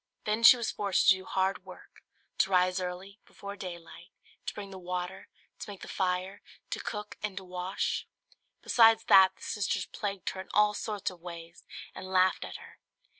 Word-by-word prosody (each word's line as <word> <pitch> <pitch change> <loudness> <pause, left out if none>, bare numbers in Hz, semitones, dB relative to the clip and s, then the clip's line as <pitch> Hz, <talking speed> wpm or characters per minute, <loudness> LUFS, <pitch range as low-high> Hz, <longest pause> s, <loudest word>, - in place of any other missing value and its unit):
Then 215 +2 -1
she 230 +2 +9
was 235 - -2
forced 200 -3 +2
to 190 - +8
do 190 0 -10
hard 190 -1 0
work; 185 -1 -14 0.4
to 190 - +3
rise 185 0 +3
early, 185 +3 -6
before 200 0 -9
daylight, 175 -4 -9 0.4
to - - -2
bring 200 -2 -7
the 190 - -8
water, 180 +1 -5 0.3
to - - -7
make 200 -2 -9
the - - -8
fire, 185 +1 -2 0.3
to - - -2
cook 210 -1 -6
and 210 -2 -4
to 190 - -5
wash. 180 +1 -3 0.6
Besides 225 -1 +5
that, 190 0 +7
the - - -16
sisters 195 -2 -1
plagued 200 -2 -4
her 190 - -6
in 190 - -13
all 210 0 +5
sorts 210 -2 -3
of 175 -2 -15
ways 170 -1 -10 0.3
and 185 - -8
laughed 185 0 +2
at - - -8
her. - - -15
190 Hz, 185 wpm, -30 LUFS, 180-205 Hz, 0.6 s, she